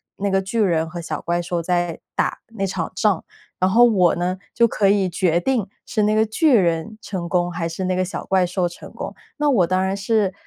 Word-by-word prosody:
那 200 0 -2
个 195 0 +2
巨 195 +4 -3
人 165 -6 +2
和 175 +1 -6
小 165 - -4
怪 170 0 -1
兽 175 0 -2
在 175 -1 -1 0.2
打 - - 0
那 225 -4 -3
场 180 -3 -3
仗， 195 -3 +1 0.4
然 185 - +3
后 230 +5 +6
我 190 -8 +4
呢， 180 +2 -2 0.2
就 235 0 +5
可 210 -2 +1
以 200 -1 +3
决 175 -1 +1
定 225 -1 0 0.2
是 215 - -1
那 210 +1 +2
个 220 0 +4
巨 265 +6 +3
人 175 +3 0
成 185 -5 -5
功 175 -1 +1
还 165 -1 -3
是 165 +3 -5
那 185 0 0
个 185 - +1
小 185 - -5
怪 190 -1 +2
兽 180 0 0
成 175 - -11
功。 - - -6 0.2
那 295 0 +1
我 200 -11 +3
当 185 +1 +1
然 190 +1 -1
是， 200 -1 +1
185 Hz, 245 characters per minute, -21 LUFS, 175-210 Hz, 0.4 s, 后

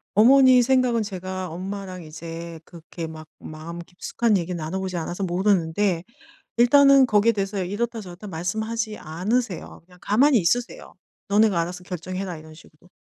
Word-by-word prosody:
어머니 255 +3 +7
생각은 245 -2 +2
제가 185 -2 -5
엄마랑 185 +1 -6
이제 165 +1 -8
그렇게 165 -1 -8
막 155 -1 -10
마음 160 +2 -8
깊숙한 195 +6 -1
얘기를 175 0 -3
나눠보지 180 +3 -4
않아서 175 +3 -4
모르는데 180 -1 +1 0.5
일단은 275 +3 +6
거기에 215 0 +3
대해서 195 -2 -2
이렇다 225 +5 -3
저렇다 185 +1 -10
말씀하지 220 +6 -3
않으세요. 190 +6 -3
그냥 180 +1 -20
가만히 255 +8 +4
있으세요. 235 +7 -1 0.3
너네가 205 -3 +3
알아서 180 +2 -4
결정해라, 185 0 -5
이런 155 0 -13
식으로. 160 +1 -19
185 Hz, 380 characters per minute, -24 LUFS, 170-220 Hz, 0.5 s, 어머니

